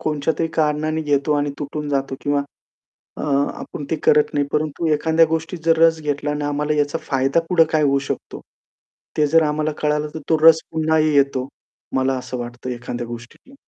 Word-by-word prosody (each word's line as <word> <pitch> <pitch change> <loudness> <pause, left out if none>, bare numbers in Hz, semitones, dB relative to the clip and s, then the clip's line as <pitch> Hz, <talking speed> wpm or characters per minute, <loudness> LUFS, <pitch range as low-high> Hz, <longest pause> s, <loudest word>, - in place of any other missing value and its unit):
कोणच्यातरी 155 +1 -1
कारणाने 155 0 0
घेतो 145 -1 +1
आणि 145 0 0
तुटून 150 +1 -5
जातो 135 -1 -1
किंवा 145 0 0 0.7
अ, - - -6
आपण 140 0 -2
ते 160 - +1
करत 150 0 +4
नाही. 145 -1 +1
परंतु 155 +2 -1
एखाद्या 160 +2 +3
गोष्टीत 160 +2 -3
जर 165 -1 +3
रस 165 -1 +4
घेतला 145 -1 -2
आणि 145 0 -2
आम्हाला 145 +1 -1
याचा 145 +2 0
फायदा 135 +3 +2
पुढं 175 -3 +5
काय 155 -1 +3
होऊ 140 -1 +3
शकतो. - - -5 0.8
ते 150 - +3
जर 160 +2 +4
आम्हाला 155 0 0
कळालं 150 0 0
तर 160 - -5
तो 160 - +3
रस 160 0 +8
पुन्हाही 155 -1 +2
येतो. 135 -2 +1 0.5
मला 130 0 +1
असं 125 0 -6
वाटतं 120 +1 -6
एखाद्या 120 0 -5
गोष्टीतला. 120 - -11
150 Hz, 175 wpm, -21 LUFS, 140-160 Hz, 0.8 s, रस